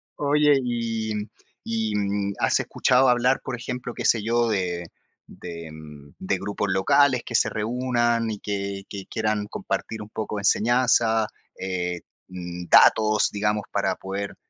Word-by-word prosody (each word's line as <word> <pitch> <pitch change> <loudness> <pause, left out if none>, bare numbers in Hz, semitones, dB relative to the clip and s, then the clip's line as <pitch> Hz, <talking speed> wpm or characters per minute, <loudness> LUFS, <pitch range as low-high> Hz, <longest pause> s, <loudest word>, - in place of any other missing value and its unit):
oye, 150 0 +3
y 115 -2 -2 0.5
y, 110 -2 -2
mm, 100 0 -1
¿has - - +2
escuchado 130 +1 +2
hablar, 125 +2 +3
por 130 - -4
ejemplo, 125 0 -5
qué - - -6
sé 115 -3 +3
yo, 120 +1 +1
de 90 -4 -1 0.4
de 85 -2 -9 0.5
de 95 0 -1
grupos 100 +1 -3
locales 125 +7 +3
que 120 - -5
se - - +3
reúnan 120 0 0
y 105 - -5
que 100 -1 -4
que 100 -2 -7
quieran 110 -1 -1
compartir 110 +1 -4
un 105 - -9
poco 105 -1 -4
de - - -3
enseñanza, 115 0 +3 0.3
eh, 90 -2 -3 0.3
mm, 90 -1 -7
datos, 110 -1 +5
digamos, 105 0 0
para - - 0
poder, 100 +1 -5
110 Hz, 145 wpm, -24 LUFS, 100-120 Hz, 0.5 s, datos